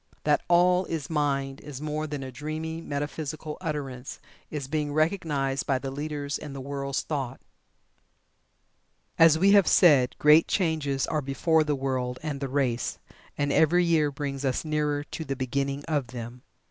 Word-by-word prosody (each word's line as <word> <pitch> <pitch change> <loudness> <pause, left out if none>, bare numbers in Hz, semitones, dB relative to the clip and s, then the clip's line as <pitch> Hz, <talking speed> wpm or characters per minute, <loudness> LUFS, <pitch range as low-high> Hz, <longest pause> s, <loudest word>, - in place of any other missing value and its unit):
That 150 -1 +3
"All 180 +1 +4
is 160 -3 -4
Mind" 140 -3 0
is 145 -3 -8
more 155 +1 -3
than 145 -2 -5
a 130 - -7
dreamy, 155 +4 -5
metaphysical 150 +1 -4
utterance, 140 -6 -5 0.3
is 145 -3 -4
being 150 0 -1
recognized 150 -4 0
by 135 - +2
the 135 +1 -5
leaders 145 0 -4
in 145 -2 -8
the 135 - -6
world's 140 0 -3
thought. 135 -5 -3 1.8
As 165 -1 +7
we 195 +4 +4
have 200 -2 +6
said, 140 -8 +5
great 150 +2 +6
changes 155 -7 0
are 155 -2 -1
before 155 +4 +2
the 150 -1 0
world 130 -2 -2
and 150 -3 -3
the 135 -1 -3
race, 125 -3 -1 0.4
and 145 0 0
every 175 +3 +4
year 160 -3 +3
brings 140 -1 -4
us 130 +3 -1
nearer 150 -1 0
to 160 - -6
the 140 -3 -3
beginning 140 +2 -2
of 145 -6 -1
them. 120 +1 -8
145 Hz, 160 wpm, -27 LUFS, 135-155 Hz, 1.8 s, As